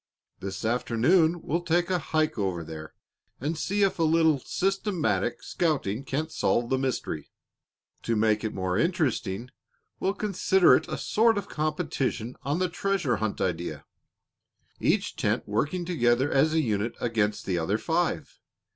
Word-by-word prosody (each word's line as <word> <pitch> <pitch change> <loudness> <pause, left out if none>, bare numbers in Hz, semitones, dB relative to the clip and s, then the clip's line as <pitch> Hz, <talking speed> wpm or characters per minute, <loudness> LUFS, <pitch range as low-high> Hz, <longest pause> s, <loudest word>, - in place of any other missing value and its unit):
This 95 +2 -5
afternoon 160 +9 +2
we'll 170 +4 -1
take 175 +1 +1
a 180 - +2
hike 155 -1 0
over 95 -4 -1
there 80 -1 -9 0.4
and 150 +6 -2
see 200 +6 0
if 195 -2 +1
a - - +3
little 160 -2 +4
systematic 195 - -1
scouting 140 - -1
can't 155 +4 -2
solve 120 +1 0
the 130 - +2
mystery. 125 - -3 0.7
To 115 - -1
make 110 0 +2
it 110 - -1
more 95 +1 -1
interesting, 130 - -1 0.5
we'll 195 +2 0
consider 190 -3 +4
it - - -1
a - - -3
sort 225 0 +2
of 205 - -3
competition 135 -5 -2
on 145 +4 -1
the 185 0 +1
treasure 175 -6 0
hunt 110 -2 -2
idea, 85 -4 -2 0.9
each - - +1
tent - - 0
working 150 - -1
together 130 -5 +2
as 150 +3 +3
a 160 - +4
unit 110 -3 -1
against 110 -3 0
the 90 -3 0
other 95 +6 0
five. 165 - -1
140 Hz, 150 wpm, -27 LUFS, 110-170 Hz, 0.9 s, little